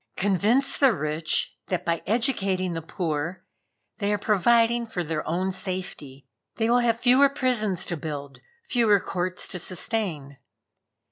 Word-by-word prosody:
Convince 205 +7 +1
the 270 -4 +5
rich 155 -1 -1
that 180 - -2
by 170 -1 0
educating 195 -6 0
the 165 - -4
poor, 165 +1 -4 0.5
they 200 -1 0
are 210 - +1
providing 230 +3 +2
for 180 -5 -3
their 160 -1 -3
own 185 +4 -1
safety. 180 -8 -6 0.3
They 225 0 0
will 245 - +5
have 235 -1 +1
fewer 260 +3 +5
prisons 220 - 0
to 175 - -1
build, 145 -2 -6 0.2
fewer 230 - +3
courts 180 0 -2
to 180 - -2
sustain. 175 - -2
190 Hz, 140 wpm, -25 LUFS, 165-230 Hz, 0.5 s, the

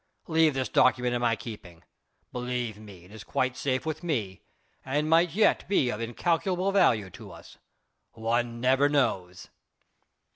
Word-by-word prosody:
Leave 160 -3 +2
this 130 -1 -1
document 125 -1 +2
in 120 - -1
my 120 -1 +2
keeping; 95 -7 -10 0.5
believe 125 -3 -4
me, 100 -5 -13
it 90 - -18
is 110 0 -10
quite 130 +1 -1
safe 130 0 -2
with 155 -1 -4
me 115 - -3 0.4
and 145 +3 -1
might 165 +2 +4
yet 220 - +2
be 140 -11 +2
of 105 - -5
incalculable 175 - -1
value 110 - +2
to - - -12
us. - - -14 0.5
One 115 +1 -1
never 130 +3 +3
knows." 95 -11 -1
125 Hz, 150 wpm, -27 LUFS, 110-150 Hz, 0.5 s, might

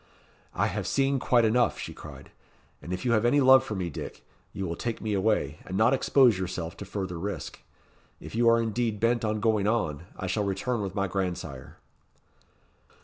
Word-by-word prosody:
"I - - +2
have 95 -1 -3
seen 135 +8 +1
quite 120 -2 +3
enough," 120 +2 +2
she - - -6
cried; - - -12 0.5
"and 85 - -8
if 90 +4 -4
you 120 - +2
have 110 -1 +3
any 120 +5 +4
love 130 -1 +7
for 110 - -5
me, 90 -3 -3
Dick, - - -8 0.3
you 95 - -4
will 85 - -3
take 115 +5 -4
me 110 -1 -2
away, 100 -6 0
and 95 - -5
not 110 +4 +4
expose 130 -5 +4
yourself 90 -2 -4
to 100 - -7
further 95 -3 -4
risk. 100 +4 -5 0.6
If - - -10
you 115 +1 +4
are 115 0 +5
indeed 115 -1 -1
bent 115 +1 +1
on 110 0 0
going 105 -2 +1
on, 85 -9 -1
I - - -5
shall 95 +3 0
return 100 +4 -1
with 95 -1 -4
my 100 -1 0
grandsire." 85 -8 -4
105 Hz, 195 wpm, -27 LUFS, 95-115 Hz, 0.6 s, love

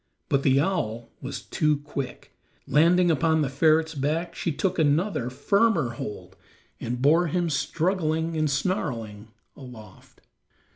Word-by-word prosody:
But 140 - +2
the 135 -1 +3
owl 120 - -2
was - - -6
too 150 -1 +1
quick; 140 -3 -7 0.3
landing 175 +3 +4
upon 160 0 +2
the 135 - -1
ferret's 160 +3 +2
back, 155 +4 -2
she 170 - -2
took 180 +5 -1
another, 155 - +1
firmer 200 - +1
hold 115 -3 -7 0.4
and 120 +1 -4
bore 160 +6 +4
him, 170 +1 -1
struggling 160 +1 -1
and 155 -1 +1
snarling, 115 - -3 0.3
aloft. 120 -7 -14
155 Hz, 130 wpm, -25 LUFS, 135-170 Hz, 0.4 s, landing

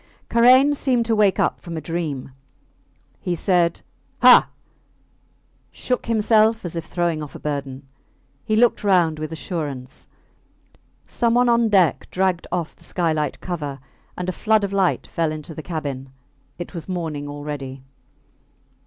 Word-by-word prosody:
Karain 255 +5 +6
seemed 255 -4 +1
to 225 -1 +1
wake 205 -3 +3
up - - 0
from 170 -2 -7
a - - -1
dream. 155 -5 -4 0.9
He 180 - -2
said, 175 -1 +1 0.4
Ha! - - +8 1.2
shook 250 -2 -3
himself 220 -1 +3
as 175 - -5
if 165 - -4
throwing 170 -3 -1
off 150 -3 -8
a - - -8
burden. 140 -2 -5 0.6
He 215 - 0
looked 235 0 +3
round 175 -6 +3
with 155 0 -5
assurance. 145 -6 -6 1.0
Someone 240 +1 +2
on 235 -1 +3
deck 185 -8 +2
dragged 185 -2 0
off 175 -3 -3
the - - -23
skylight 155 -5 -1
cover, 150 -6 -4 0.4
and 180 - -4
a - - 0
flood 215 +3 +1
of 200 0 -2
light 190 -2 +1
fell 165 -2 -1
into 155 +1 -7
the 155 - -7
cabin. 145 -5 -5 0.5
It 175 - -7
was 170 0 -7
morning 160 -5 -3
already. 145 -2 -6
170 Hz, 145 wpm, -22 LUFS, 150-210 Hz, 1.2 s, Ha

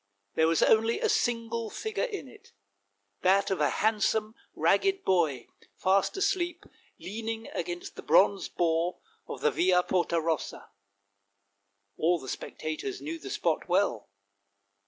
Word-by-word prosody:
There 160 - +3
was 165 0 +3
only 225 +1 +3
a - - +1
single 230 -1 0
figure 435 - -2
in 405 - -6
it, - - -17 0.7
that 195 +2 +3
of 190 - 0
a - - +3
handsome 215 0 +1 0.2
ragged 390 0 +2
boy, 155 -9 +1 0.3
fast 190 - +1
asleep, 365 -3 -1 0.3
leaning 225 +3 -5
against 175 +1 -5
the - - -6
bronze 200 0 +3
boar 170 +1 0 0.3
of - - -7
the - - +3
Via 180 0 +3
Porta 175 -2 +1
Rossa. 160 -1 -3 1.3
All 175 +2 +2
the 135 - -11
specta 155 +4 -5
tors 405 -1 -4
knew 325 +2 -5
the - - -8
spot 165 +2 -1
well. 180 - +1
200 Hz, 135 wpm, -29 LUFS, 170-235 Hz, 1.3 s, There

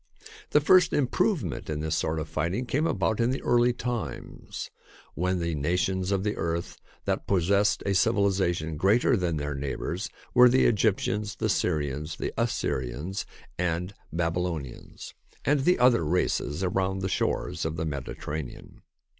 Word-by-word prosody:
The 150 - +4
first 180 +3 +5
improvement 135 - 0
in 75 -1 -2
this 80 0 -1
sort 80 +1 -1
of 80 - -4
fighting 85 +11 -2
came 145 +6 0
about 95 - 0
in 115 +1 +3
the 130 - -2
early 120 0 +4
times, 120 -2 -5 0.4
when 90 +1 0
the 85 -1 -1
nations 90 +5 0
of 100 -1 +1
the 105 0 -1
earth 85 0 -3 0.2
that - - -1
possessed 100 +3 +2
a 100 - +1
civilisation 95 -6 +1
greater 105 +9 +3
than 90 -6 0
their 75 0 -3
neighbours 70 +6 -3 0.2
were 125 -1 +8
the 130 +2 +4
Egyptians, 105 -1 +1
the - - -1
Syrians, 75 +1 -1
the - - -4
Assyrians, 65 +10 -2 0.3
and 90 +2 -1 0.2
Babylonians, 85 -5 -3 0.3
and 140 -1 +2
the 180 - +4
other 125 -7 +4
races 85 0 0
around 95 +1 0
the - - +1
shores 95 - -1
of 80 0 -2
the 80 0 -2
Mediterranean. 75 -1 -6
90 Hz, 145 wpm, -27 LUFS, 80-110 Hz, 0.4 s, were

